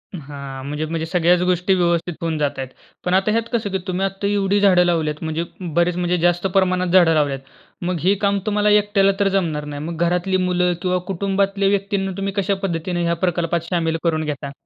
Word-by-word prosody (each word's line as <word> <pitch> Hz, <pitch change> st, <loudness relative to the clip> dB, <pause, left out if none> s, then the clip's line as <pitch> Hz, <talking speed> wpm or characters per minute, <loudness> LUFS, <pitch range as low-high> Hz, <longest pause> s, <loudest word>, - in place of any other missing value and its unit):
हां, 140 Hz, -3 st, -8 dB
म्हणजे-म्हणजे 155 Hz, +3 st, -3 dB
सगळ्याच 175 Hz, +1 st, +2 dB
गोष्टी 180 Hz, +2 st, +2 dB
व्यवस्थित 175 Hz, -1 st, +1 dB
होऊन 165 Hz, -2 st, -1 dB
जात 145 Hz, -2 st, +1 dB
आहेत. 130 Hz, -1 st, -4 dB, 0.4 s
पण 180 Hz, -, 0 dB
आता 195 Hz, +3 st, +3 dB
ह्यात 230 Hz, +1 st, +1 dB
कसं 225 Hz, -3 st, 0 dB
की 190 Hz, -, 0 dB
तुम्ही 185 Hz, +1 st, -1 dB
आता 195 Hz, +1 st, -3 dB
एवढी 200 Hz, 0 st, +1 dB
झाडं 190 Hz, -3 st, +5 dB
लावल्यात 160 Hz, -3 st, -1 dB
म्हणजे 160 Hz, +1 st, -2 dB, 0.3 s
बरेच 175 Hz, +1 st, +2 dB
म्हणजे 180 Hz, 0 st, 0 dB
जास्त 175 Hz, +2 st, +2 dB
प्रमाणात 185 Hz, -1 st, +2 dB
झाडं 175 Hz, -2 st, +5 dB
लावल्यात. 145 Hz, -3 st, +1 dB, 0.4 s
मग 175 Hz, -1 st, -2 dB
हे 190 Hz, +3 st, +4 dB
काम 200 Hz, -1 st, +2 dB
तुम्हाला 210 Hz, -1 st, +2 dB
एकट्याला 205 Hz, -1 st, +4 dB
तर 200 Hz, -, +3 dB
जमणार 160 Hz, -6 st, -1 dB
नाही. 145 Hz, 0 st, -6 dB
मग 165 Hz, +1 st, -5 dB
घरातली 180 Hz, +2 st, +1 dB
मुलं 180 Hz, -1 st, +1 dB
किंवा 180 Hz, 0 st, +1 dB
कुटुंबातल्या 195 Hz, +1 st, 0 dB
व्यक्तींना 200 Hz, -1 st, -1 dB
तुम्ही 195 Hz, 0 st, -2 dB
कशा 200 Hz, 0 st, 0 dB
पद्धतीने 175 Hz, -1 st, -2 dB
ह्या 170 Hz, 0 st, +1 dB
प्रकल्पात 170 Hz, -1 st, 0 dB
शामिल 165 Hz, -2 st, 0 dB
करून 160 Hz, -2 st, +1 dB
घेता? 145 Hz, -1 st, -4 dB
180 Hz, 190 wpm, -20 LUFS, 165-195 Hz, 0.4 s, झाडं